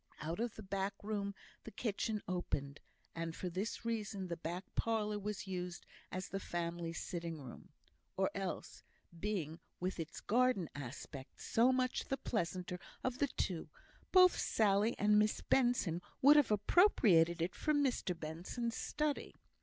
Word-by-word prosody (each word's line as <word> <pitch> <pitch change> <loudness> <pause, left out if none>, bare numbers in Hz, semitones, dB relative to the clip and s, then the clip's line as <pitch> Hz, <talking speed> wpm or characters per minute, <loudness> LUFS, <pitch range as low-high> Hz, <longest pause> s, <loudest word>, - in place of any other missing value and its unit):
Out 160 +5 -3
of 235 -1 -1
the 215 - -8
back 195 +1 -2
room 200 -1 -2 0.3
the - - -7
kitchen 215 0 -2
opened, 145 -6 -2 0.3
and 165 0 -3
for 180 - -3
this 200 +6 -3
reason 210 -5 -2
the 170 - -1
back 170 +3 -4
parlour 210 -2 0
was 205 0 -4
used 180 -2 -4 0.3
as 185 0 -3
the 195 - -2
family 170 -2 -3
sitting 165 -1 -4
room; 130 -4 -10 0.5
or - - +2
else, - - -4 0.4
being, 170 -6 -2 0.2
with 185 0 -2
its 165 0 -5
garden 245 -6 +2
aspect, 135 0 -8
so 240 +3 +4
much 255 -1 +1
the 270 - 0
pleasanter 180 -6 -2 0.2
of 255 -1 -1
the 285 - +3
two, 170 - -2 0.4
both 365 -1 +8
Sally 210 +1 +3
and 210 +1 +5
Miss 210 0 +2
Benson 240 -10 +2 0.2
would 285 +3 +8
have 295 -3 +6
appropriated 205 - +5
it 170 +3 0
for 305 - 0
Mr 260 - +1
Benson's 180 +10 -3
study. 300 -1 -2
195 Hz, 150 wpm, -36 LUFS, 170-230 Hz, 0.5 s, both